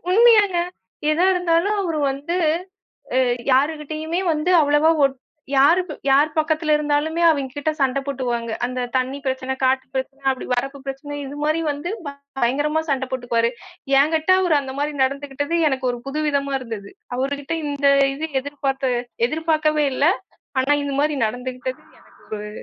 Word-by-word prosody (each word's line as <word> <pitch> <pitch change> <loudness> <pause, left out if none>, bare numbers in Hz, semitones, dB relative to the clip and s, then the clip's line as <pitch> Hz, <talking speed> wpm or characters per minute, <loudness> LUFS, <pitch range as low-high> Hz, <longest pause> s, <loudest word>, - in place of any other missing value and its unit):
உண்மையாங்க, 420 -3 +6 0.6
எதா 340 +4 +2
இருந்தாலும் 360 +3 +2
அவர் 330 -4 -2
வந்து 285 +5 -4 0.8
அ - - +5 0.3
யாருகிட்டயுமே 310 +4 0
வந்து 310 +4 0
அவ்வளவா 295 +2 +4
ஓட் 275 -1 +3 0.4
யார் 290 +7 +6 0.3
யார் 290 +3 +5
பக்கத்தில 310 0 +2
இருந்தாலுமே 300 +3 0
அவிங்கிட்ட 285 0 -1
சண்டை 270 0 +2
போட்டுக்குவாங்க. 240 -4 -2
அந்தத் 250 -1 -4
தண்ணி 260 +2 -1
பிரச்சனை, 260 0 -1
காட்டுப் 260 0 +1
பிரச்சனை 270 +1 -4
அப்படி 260 - -4
வரப்புப் 275 +2 -4
பிரச்சனை 270 +2 -6
இது 280 +2 -7
மாதிரி 310 +2 +1
வந்து 290 +5 -5 0.5
பயங்கரமா 290 +6 +1
சண்டை 265 -1 0
போட்டுக்குவாரு. 235 -2 +1 0.5
எங்கிட்ட 315 +4 +2
அவர் 355 -4 +2
அந்த 265 -1 -6
மாதிரி 295 +1 -1
நடந்துகிட்டது 285 +3 -2
எனக்கு 265 -2 -2
ஒரு 245 - -4
புதுவிதமா 280 -1 -1
இருந்தது. 225 -5 -7 0.3
அவர்கிட்ட 280 +3 -2
இந்த 285 -1 +1 0.3
இது 310 +3 -3 0.2
எதிர்பார்த்த 275 -2 -2 0.4
எதிர்பார்க்கவே 310 0 +1
இல்லை. 285 +5 +3 0.5
ஆனா, 265 +3 +2
இந்த 285 -1 -3
மாதிரி 300 0 +1
நடந்துகிட்டது 255 +4 -5 0.2
எனக்கு - - -22 0.3
ஒரு 210 - -6
285 Hz, 140 wpm, -22 LUFS, 265-310 Hz, 0.8 s, உண்மையாங்க